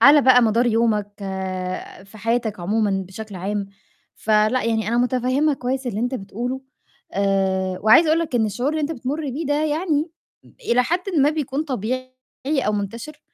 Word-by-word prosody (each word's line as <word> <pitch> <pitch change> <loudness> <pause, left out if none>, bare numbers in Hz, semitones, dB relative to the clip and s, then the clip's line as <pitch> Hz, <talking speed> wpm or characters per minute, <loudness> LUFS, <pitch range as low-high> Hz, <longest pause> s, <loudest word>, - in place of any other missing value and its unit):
على 290 +1 +8
بقى 250 -1 +6
مدار 230 +2 +3
يومك، 220 -3 +1 0.9
في 205 +2 -15
حياتك 225 -3 -1
عمومًا 200 0 0
بشكل 210 +2 -8
عام. 200 +2 -2 0.5
فلأ، 215 +3 +2
يعني 220 -2 0
أنا 235 - +1
مُتفهّمة 255 +4 +2
كويس 260 0 -3
اللي 215 -3 -2
أنت 245 +2 -1
بتقوله، 245 +5 -4 0.5
آآ 190 -1 0
وعايزة 220 +10 +6
أقول 315 - +4
لك 325 -6 -4
إن 225 -2 +3
الشعور 245 +7 -1
اللي 310 0 -1
أنت 295 +2 -1
بتمُر 275 +2 -3
بيه 300 +5 -4
ده 290 +2 +1
يعني 310 0 0 0.6
إلى 245 +1 +5
حدٍ 345 +7 0 0.2
ما 285 +2 +5
بيكون 295 -2 -2
طبيعي 255 -2 -3 0.4
أو 270 -7 +1
منتَشر 230 +9 -5
245 Hz, 160 wpm, -22 LUFS, 210-280 Hz, 0.9 s, على